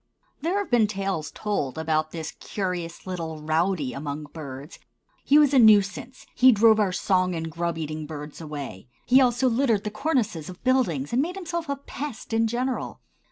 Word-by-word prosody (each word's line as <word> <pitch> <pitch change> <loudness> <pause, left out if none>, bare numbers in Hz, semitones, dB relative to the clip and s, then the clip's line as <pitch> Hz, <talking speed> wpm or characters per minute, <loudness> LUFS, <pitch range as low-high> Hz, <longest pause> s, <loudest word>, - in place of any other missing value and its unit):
There 340 +6 0
have 405 -6 -3
been 230 -3 +4
tales 195 -7 -3
told 180 -11 -3
about 155 -1 0
this 160 -1 -6
curious 180 -4 -4
little 165 -4 -5
rowdy 160 -1 0
among 145 +1 -5
birds. 140 -1 -8 0.4
He 290 - +5
was 295 -2 +5
a 270 - +6
nuisance; 215 +3 +3
he 260 +1 +6
drove 220 0 +5
our 200 -3 +2
song 185 -1 +1
and 165 0 -4
grub 170 +1 -2
eating 155 -1 -4
birds 150 0 -8
away; 145 - -7 0.2
he 260 +2 +6
also 250 0 +3
littered 230 -4 +2
the 210 - -3
cornices 215 - -1
of 180 +1 -11
buildings 235 - +1
and 250 - +3
made 355 +6 -3
of - - -5
himself 340 -2 -4
a 280 - 0
pest 275 -4 -7
in 225 0 +3
general. 250 +3 -3
195 Hz, 180 wpm, -25 LUFS, 160-250 Hz, 0.4 s, a